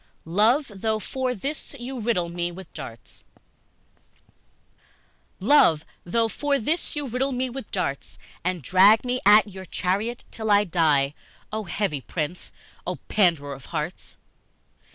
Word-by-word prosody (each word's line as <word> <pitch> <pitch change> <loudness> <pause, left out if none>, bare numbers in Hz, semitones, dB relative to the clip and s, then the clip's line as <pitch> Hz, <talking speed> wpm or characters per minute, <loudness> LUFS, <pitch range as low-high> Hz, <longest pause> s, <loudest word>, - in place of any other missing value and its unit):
Love, 220 - +3
though 220 +2 0
for 255 +3 -2
this 280 +7 -6
you 255 0 -6
riddle 215 -6 0
me 175 0 -3
with 185 0 -11
darts 115 0 -10 2.2
LOVE, 190 - +5 0.2
though 225 +6 +1
for 285 +6 0
this 310 +8 -1
you 295 -1 -2
riddle 260 +3 -1
me 255 0 -2
with 265 -3 -7
darts, 140 -8 -3 0.3
And 180 -3 -1
drag 200 - +6
me 250 +1 0
at 210 +1 +8
your 190 -1 -9
charriot 200 +8 0
till 220 -1 -4
I 205 0 +6
die, 155 -7 +2 0.4
Oh, 215 -1 -2
heavy 175 -6 -2
prince! 160 +5 -4 0.4
Oh, - - -1
panderer 165 -9 +2
of 135 -1 -11
hearts! 160 +2 -5
205 Hz, 135 wpm, -25 LUFS, 170-245 Hz, 2.2 s, at